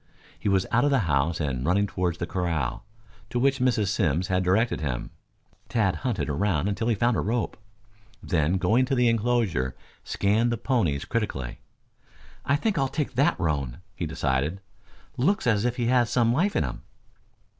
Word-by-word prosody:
He - - -1
was 95 -1 +2
out 120 - +3
of 145 - +3
the 135 -3 +3
house 75 +2 +1
and 70 -5 -2
running 100 +6 +2
toward 90 -3 -2
the 85 - -3
corral, 85 - -2 0.5
to 125 - -3
which 135 +2 +2
Mrs. 115 -6 +2
Simms 90 -3 0
had 95 0 +1
directed 100 +3 +1
him. 65 -5 -3 0.6
Tad 105 -6 +1
hunted 125 -3 -2
about 80 +2 0
until 105 +3 -1
he 115 - +2
found 120 +3 +2
a - - 0
rope; 115 +2 -1 0.7
then 85 0 +1
going 110 +8 +3
to 135 +1 0
the 125 -1 +3
enclosure 115 - +1 0.3
scanned 110 +4 +1
the 120 - -1
ponies 95 - 0
critically. 70 - -3 0.8
"I 140 - +2
think 195 +2 0
I'll 135 - +2
take 140 0 -3
that 135 +4 +2
roan," 70 -8 -1 0.2
he - - -3
decided. 70 +8 -1 0.6
"Looks 185 +9 +1
as 110 -2 +2
if 125 0 0
he 120 -2 -1
had 120 0 +3
some 120 0 +2
life 190 +9 +1
in - - +2
him." - - -5
105 Hz, 175 wpm, -26 LUFS, 85-120 Hz, 0.8 s, out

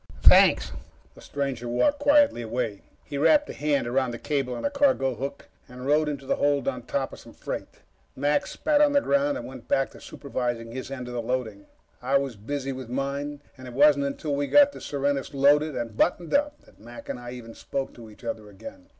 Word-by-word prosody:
"Thanks." - - +6 0.4
The - - -16
stranger 135 -4 -3
walked 285 - +2
quietly 290 - +4
away. 115 -3 -3 0.2
He 140 - -5
wrapped 295 - +4
a - - -8
hand 145 -3 0
around 130 +2 0
the 120 - -5
cable 135 -2 -2
on - - -5
a 285 - 0
cargo 270 - +2
hook 135 +4 -6 0.2
and 125 +1 -9
rode 150 +2 +3
into 140 -2 -5
the - - 0
hold 145 -2 +1
on 130 -2 -1
top 135 -1 -2
of - - -10
some - - -14
freight. - - -7 0.3
Mac 145 +6 +1
spat 295 +6 +1
on 295 -1 +4
the 285 - +4
ground 280 0 +1
and - - -7
went 130 -2 -10
back 135 0 +1
to - - -14
supervising 120 -4 -4
his 130 +2 -6
end 130 -2 -6
of 125 - -7
the 120 - -2
loading. 115 -4 -3 0.3
I 140 - +2
was 135 -3 -3
busy 135 +6 -4
with 130 -2 -7
mine, 140 +2 -3
and 130 -2 -11
it 120 - -9
wasn't 145 0 +5
until 140 +2 -3
we'd 145 0 -1
gotten 290 -1 +6
the - - -10
Serenus 140 0 -2
loaded 145 +2 +4
and 115 -2 -4
buttoned 175 +6 +1
up 295 +1 +1
that - - -22
Mac 120 +3 -11
and - - -4
I 120 0 -8
even 115 -2 -9
spoke 135 +3 -4
to 115 -2 -12
each 105 - -17
other 110 -2 -5
again. 275 - -12
135 Hz, 220 wpm, -26 LUFS, 125-150 Hz, 0.4 s, Thanks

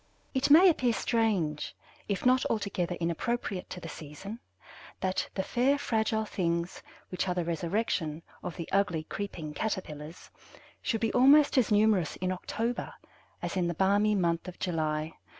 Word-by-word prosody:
It 265 +1 +1
may 330 +6 +9
appear 255 -9 +3
strange, 200 -12 0 0.3
if 200 +1 -2
not 255 0 +5
altogether 195 -5 -1
inappropriate 180 +4 -2
to 180 - -6
the 165 - -8
season, 165 +9 -8 0.6
that 185 0 -1
"the 190 - 0
fair 260 +7 +2
fragile 220 -4 0
things 170 -3 -2 0.3
which 180 - -2
are 180 - 0
the 175 -2 -1
resurrection 170 -2 -1 0.2
of 175 - -5
the 170 - -5
ugly, 190 -5 +1
creeping 165 -4 -5
caterpillars" 160 -5 -5 0.5
should 225 -4 -1
be 225 - 0
almost 280 +4 +6
as 250 -5 +3
numerous 205 -5 +3
in 185 0 -2
October 230 +6 -3 0.5
as - - -3
in 180 -2 +1
the 170 - -2
balmy 205 +3 +3
month 170 -2 0
of 180 - -8
July. 155 -3 -1
190 Hz, 150 wpm, -29 LUFS, 170-225 Hz, 0.6 s, may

